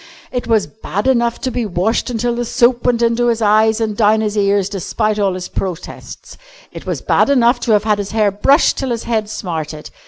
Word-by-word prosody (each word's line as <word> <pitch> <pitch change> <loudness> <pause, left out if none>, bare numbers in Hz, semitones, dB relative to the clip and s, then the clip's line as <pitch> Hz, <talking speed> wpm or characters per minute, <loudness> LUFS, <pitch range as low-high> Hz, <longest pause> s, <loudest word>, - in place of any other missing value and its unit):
It 250 -1 -4
was 220 -3 +2
bad 205 -1 -5
enough 235 -3 +1
to 260 - -2
be 245 -1 -2
washed 205 +2 -1
till 240 0 -1
the 240 +1 -2
soap 240 +1 +1
went 240 -1 +2
into 235 +1 +1
his 230 -1 +1
eyes 220 +1 +3
and 220 -2 -2
down 215 0 +3
his 210 -1 -2
ears 200 -2 +1
despite 210 +2 -2
all 195 -2 +1
his 180 0 -6
protests. 180 -3 -7 0.3
It - - -10
was - - -3
bad - - +2
enough 245 -2 +3
to 240 - -1
have 210 0 +3
had 210 -1 +1
his 200 -1 -4
hair 215 -2 +1
brushed 270 - +3
till 265 - -3
his 235 -2 -3
head 220 -3 -2
smarted. 160 -7 -6
220 Hz, 215 wpm, -17 LUFS, 205-235 Hz, 0.3 s, eyes